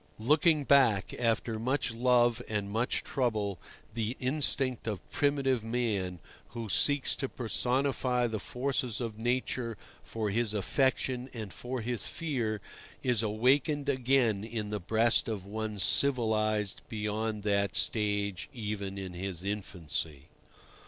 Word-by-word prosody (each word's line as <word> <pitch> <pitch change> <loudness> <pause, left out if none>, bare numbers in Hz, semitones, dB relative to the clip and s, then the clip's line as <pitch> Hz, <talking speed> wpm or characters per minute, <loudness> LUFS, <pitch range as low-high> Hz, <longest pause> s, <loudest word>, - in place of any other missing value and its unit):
Looking 150 +6 +3
back 130 -8 +4
after 115 -1 +1
much 125 +2 0
love 120 0 +3
and 105 -2 -2
much 115 +4 0
trouble, 105 -7 -1 0.3
the 115 +2 -2
instinct 130 -2 0
of 105 -4 -4
primitive 135 -4 +1
man, 110 -6 -1 0.4
who 115 -2 -4
seeks 145 +6 +2
to 135 - -2
personify 125 +1 0
the 110 -2 -2
forces 125 -1 -2
of 115 -3 -4
Nature 120 -1 -1 0.2
for 110 -2 -3
his 110 0 +1
affection 130 +4 +1
and 110 -5 -6
for 125 0 -4
his 120 0 -1
fear, 120 - -2 0.4
is 125 -4 +2
awakened 130 +7 +2
again 125 -6 +2
in 110 -2 -4
the 105 - -1
breast 110 +5 +2
of 105 -5 -3
one 110 +1 -4
civilized 110 -2 +1
beyond 110 0 -2
that 100 -1 +1
stage 100 -4 0
even 105 -5 -4
in 95 -2 -5
his 90 -1 -4
infancy. 85 -7 -3
115 Hz, 125 wpm, -31 LUFS, 105-125 Hz, 0.4 s, back